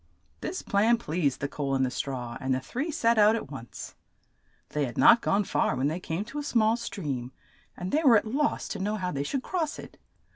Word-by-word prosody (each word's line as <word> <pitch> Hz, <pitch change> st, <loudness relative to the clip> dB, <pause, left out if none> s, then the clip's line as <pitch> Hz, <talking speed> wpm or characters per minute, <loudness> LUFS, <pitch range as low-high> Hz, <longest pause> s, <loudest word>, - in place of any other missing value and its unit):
This -, -, -4 dB
plan 220 Hz, +4 st, +3 dB
pleased 160 Hz, -, -1 dB
the 145 Hz, -, 0 dB
coal 140 Hz, -1 st, -2 dB
and 130 Hz, 0 st, +2 dB
the 125 Hz, -, -2 dB
straw, 125 Hz, -3 st, -4 dB
and 130 Hz, 0 st, +1 dB
the -, -, -1 dB
three 255 Hz, -, -4 dB
set 230 Hz, -7 st, +2 dB
out 210 Hz, +1 st, +6 dB
at 185 Hz, -11 st, -5 dB
once. 120 Hz, -5 st, -8 dB, 0.8 s
They 150 Hz, -1 st, 0 dB
had 120 Hz, -, -7 dB
not 235 Hz, -, +7 dB
gone 205 Hz, +1 st, +2 dB
far 185 Hz, -, 0 dB
when 130 Hz, +3 st, +1 dB
they 160 Hz, +3 st, -3 dB
came 175 Hz, +3 st, -3 dB
to 275 Hz, +6 st, -6 dB
a -, -, -4 dB
small 225 Hz, -5 st, +3 dB
stream, 145 Hz, -, -4 dB, 0.5 s
and 180 Hz, +1 st, -4 dB
they 310 Hz, -, +2 dB
were 255 Hz, -8 st, +7 dB
at 205 Hz, -, 0 dB
loss 280 Hz, +7 st, 0 dB
to 205 Hz, -, -4 dB
know 205 Hz, +3 st, -1 dB
how 185 Hz, -3 st, -2 dB
they 140 Hz, -, -2 dB
should 255 Hz, -, -2 dB
cross 330 Hz, -5 st, -2 dB
it. -, -, -11 dB
195 Hz, 225 wpm, -28 LUFS, -, 0.8 s, not